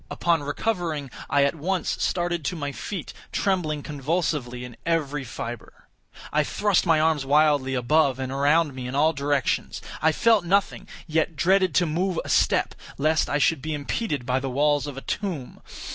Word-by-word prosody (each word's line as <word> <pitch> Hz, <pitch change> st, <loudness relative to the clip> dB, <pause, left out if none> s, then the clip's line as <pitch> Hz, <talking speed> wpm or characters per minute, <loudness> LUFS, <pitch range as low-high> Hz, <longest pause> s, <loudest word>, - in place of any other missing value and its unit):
Upon 170 Hz, -3 st, +1 dB
recovering, 155 Hz, -, -2 dB, 0.2 s
I 140 Hz, 0 st, +3 dB
at 140 Hz, -, +2 dB
once 180 Hz, +4 st, -2 dB
started 175 Hz, -2 st, 0 dB
to 180 Hz, -, -1 dB
my 145 Hz, -3 st, -3 dB
feet, 180 Hz, +4 st, -6 dB, 0.2 s
trembling 160 Hz, -7 st, 0 dB
convulsively 145 Hz, -4 st, -2 dB
in 120 Hz, -2 st, -10 dB
every 150 Hz, -4 st, -1 dB
fibre. 120 Hz, -1 st, -8 dB, 0.4 s
I 150 Hz, 0 st, +3 dB
thrust 200 Hz, +4 st, +1 dB
my 165 Hz, -2 st, +4 dB
arms 155 Hz, -2 st, +2 dB
wildly 145 Hz, -2 st, +3 dB
above 135 Hz, +2 st, +2 dB
and 130 Hz, -1 st, -4 dB
around 145 Hz, +2 st, +2 dB
me 130 Hz, -1 st, -6 dB
in 125 Hz, -, -5 dB
all 155 Hz, +3 st, +3 dB
directions. 140 Hz, -2 st, -1 dB, 0.2 s
I 160 Hz, -, +4 dB
felt 220 Hz, +4 st, +3 dB
nothing; 195 Hz, +3 st, 0 dB, 0.2 s
yet 160 Hz, 0 st, 0 dB
dreaded 185 Hz, +2 st, +2 dB
to 180 Hz, -, +4 dB
move 175 Hz, +3 st, -1 dB
a -, -, -7 dB
step, -, -, +2 dB, 0.2 s
lest 155 Hz, +2 st, +2 dB
I 145 Hz, -, +1 dB
should 150 Hz, 0 st, +2 dB
be 155 Hz, +1 st, -3 dB
impeded 145 Hz, -, -3 dB
by 125 Hz, +1 st, +1 dB
the 135 Hz, 0 st, -4 dB
walls 145 Hz, +2 st, +1 dB
of 140 Hz, -2 st, -7 dB
a -, -, -5 dB
tomb. 170 Hz, -11 st, -4 dB
150 Hz, 175 wpm, -25 LUFS, 140-170 Hz, 0.4 s, my